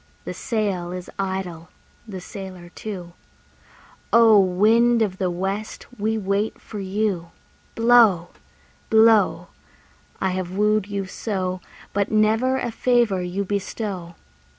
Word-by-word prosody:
The -, -, -4 dB
sail 200 Hz, -7 st, -2 dB
is 180 Hz, 0 st, -7 dB
idle, 190 Hz, -3 st, -4 dB, 0.4 s
the 190 Hz, -4 st, -7 dB
sailor 185 Hz, -2 st, -9 dB
too; 180 Hz, -3 st, -7 dB, 1.0 s
O! 225 Hz, -3 st, +7 dB
wind 220 Hz, +5 st, +4 dB
of 190 Hz, -3 st, -3 dB
the 185 Hz, -2 st, +1 dB
west, 195 Hz, +4 st, -4 dB
we 220 Hz, +2 st, 0 dB
wait 200 Hz, +1 st, -1 dB
for 210 Hz, -, -8 dB
you. 195 Hz, -3 st, -2 dB, 0.5 s
Blow, 225 Hz, -7 st, +5 dB, 0.6 s
blow! 220 Hz, -1 st, +4 dB, 0.7 s
I 190 Hz, -, 0 dB
have 185 Hz, -1 st, -3 dB
wooed 210 Hz, -1 st, +2 dB
you 200 Hz, -1 st, -3 dB
so, 185 Hz, -2 st, -3 dB, 0.3 s
But 200 Hz, 0 st, 0 dB
never 220 Hz, +5 st, +2 dB
a 240 Hz, -, -2 dB
favour 235 Hz, -5 st, +2 dB
you 180 Hz, +3 st, -3 dB
bestow. 195 Hz, -3 st, -4 dB
200 Hz, 120 wpm, -23 LUFS, 185-220 Hz, 1.0 s, O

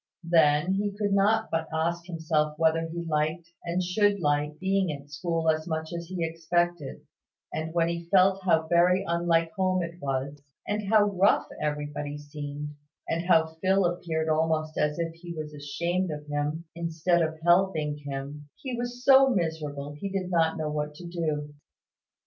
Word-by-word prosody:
Then, 165 Hz, 0 st, +4 dB
he 200 Hz, +1 st, -1 dB
could 205 Hz, -2 st, 0 dB
not 215 Hz, +3 st, +2 dB
but 165 Hz, 0 st, -1 dB
ask 170 Hz, +2 st, -1 dB
himself 155 Hz, -3 st, -1 dB
whether 165 Hz, 0 st, +2 dB
he 170 Hz, +1 st, -5 dB
liked, 155 Hz, +2 st, -1 dB
and 175 Hz, +2 st, -1 dB
should 200 Hz, +3 st, +2 dB
like, 150 Hz, -1 st, 0 dB
being 190 Hz, 0 st, +1 dB
at 145 Hz, 0 st, -9 dB
school 165 Hz, +3 st, -2 dB
as 155 Hz, +1 st, -3 dB
much 160 Hz, 0 st, -3 dB
as 170 Hz, 0 st, -5 dB
he 175 Hz, -2 st, -2 dB
expected; 165 Hz, -1 st, -1 dB, 0.5 s
and 160 Hz, +1 st, -3 dB
when 165 Hz, -1 st, +3 dB
he 170 Hz, 0 st, -4 dB
felt 190 Hz, 0 st, +4 dB
how 170 Hz, -4 st, +3 dB
very 180 Hz, +3 st, +4 dB
unlike 170 Hz, -1 st, +2 dB
home 185 Hz, 0 st, +1 dB
it 170 Hz, +1 st, -7 dB
was, 140 Hz, +1 st, -3 dB, 0.3 s
and 210 Hz, -1 st, -2 dB
how 215 Hz, -2 st, +6 dB
rough 200 Hz, -1 st, +3 dB, 0.2 s
everybody 150 Hz, -1 st, -3 dB
seemed, 145 Hz, 0 st, -6 dB, 0.4 s
and 170 Hz, +2 st, -2 dB
how 160 Hz, -3 st, +5 dB, 0.2 s
Phil 190 Hz, 0 st, +3 dB
appeared 170 Hz, -2 st, -1 dB
almost 155 Hz, 0 st, +1 dB
as 150 Hz, 0 st, 0 dB
if 165 Hz, -1 st, -2 dB
he 170 Hz, +1 st, -9 dB
was 155 Hz, -1 st, -6 dB
ashamed 170 Hz, +6 st, -2 dB
of 150 Hz, -1 st, -5 dB
him, 150 Hz, +3 st, -2 dB
instead 170 Hz, +1 st, +1 dB
of 160 Hz, -1 st, -1 dB
helping 175 Hz, -4 st, +2 dB
him, 145 Hz, +1 st, -7 dB
he 260 Hz, -3 st, -5 dB
was 245 Hz, +1 st, -5 dB
so 270 Hz, 0 st, +7 dB
miserable 155 Hz, -, -2 dB
he 175 Hz, +7 st, -5 dB
did 190 Hz, -1 st, -3 dB
not 165 Hz, -2 st, +2 dB
know 155 Hz, -1 st, -2 dB
what 150 Hz, 0 st, -3 dB
to 175 Hz, -, -10 dB
do. 155 Hz, -4 st, -3 dB
165 Hz, 170 wpm, -27 LUFS, 150-180 Hz, 0.5 s, so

